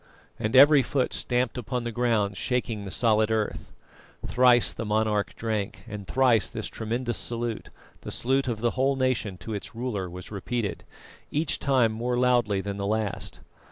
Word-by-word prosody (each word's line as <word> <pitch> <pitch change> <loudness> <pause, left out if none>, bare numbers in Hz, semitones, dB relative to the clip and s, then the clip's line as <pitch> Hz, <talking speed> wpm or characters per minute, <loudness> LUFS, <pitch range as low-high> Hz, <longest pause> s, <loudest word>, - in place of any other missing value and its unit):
_" - - -32 0.4
and 110 +3 -1
every 145 +2 +8
foot 130 +1 -1
stamped 125 0 -1
upon 125 +1 -3
the 120 - -3
ground, 110 -4 +1
shaking 115 -1 -2
the - - -5
solid 110 +1 +2
earth. 110 -1 -2 0.5
Thrice 125 -1 +4
the - - -5
monarch 105 -1 0
drank, 110 -3 -3
and 100 -2 -7
thrice 125 -5 +3
this - - -5
tremendous 120 +2 -2
salute, 120 -1 -3 0.3
the - - -7
salute 135 +2 +1
of 115 -3 -2
the 120 -1 +2
whole 135 +2 +1
nation 130 -7 0
to 95 +5 -7
its 105 +3 -6
ruler, 110 -6 -3
was 90 +3 -9
repeated, 105 +1 -3 0.4
each 150 0 -1
time 130 -5 +3
more 120 +3 -2
loudly 120 -5 +2
than 100 0 -4
the 100 0 -2
last. 110 -1 -2
115 Hz, 170 wpm, -26 LUFS, 105-125 Hz, 0.5 s, every